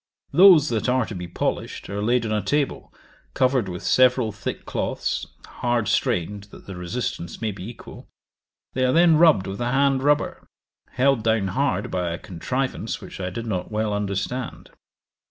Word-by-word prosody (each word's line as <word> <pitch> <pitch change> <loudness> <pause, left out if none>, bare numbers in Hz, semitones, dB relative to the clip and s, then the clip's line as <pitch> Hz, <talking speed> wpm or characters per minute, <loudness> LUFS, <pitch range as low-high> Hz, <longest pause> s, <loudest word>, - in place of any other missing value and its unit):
Those 175 -5 +7
that 115 +1 -1
are 130 -1 +2
to 110 - -7
be 90 -2 -6
polished, 85 - -3
are 100 +1 -4
laid 120 +2 +1
on 110 - -2
a 105 -1 +1
table, 145 +8 -1 0.4
covered 130 -6 +2
with 90 -1 -6
several 125 -3 +3
thick 100 -1 -6
cloths, - - -2 0.2
hard 120 -3 -1
strained, 100 +1 0
that 100 - -15
the 95 - -8
resistance 90 -1 -4
may 110 -1 -1
be 100 +1 -8
equal; 120 - -12 0.7
they 130 - 0
are 130 0 +3
then 165 -1 +5
rubbed 155 - +5
with 95 +4 -5
a 120 0 0
hand 135 0 +2
rubber, 145 +2 0 0.5
held 135 -1 +2
down 110 -3 +1
hard 140 +5 -1
by 90 -2 -1
a 85 - -3
contrivance 125 +10 -3
which - - -10
I 90 -1 -2
did 115 +6 -6
not 95 -4 -3
well 110 0 -1
understand. 105 +5 -3
115 Hz, 170 wpm, -23 LUFS, 100-130 Hz, 0.7 s, Those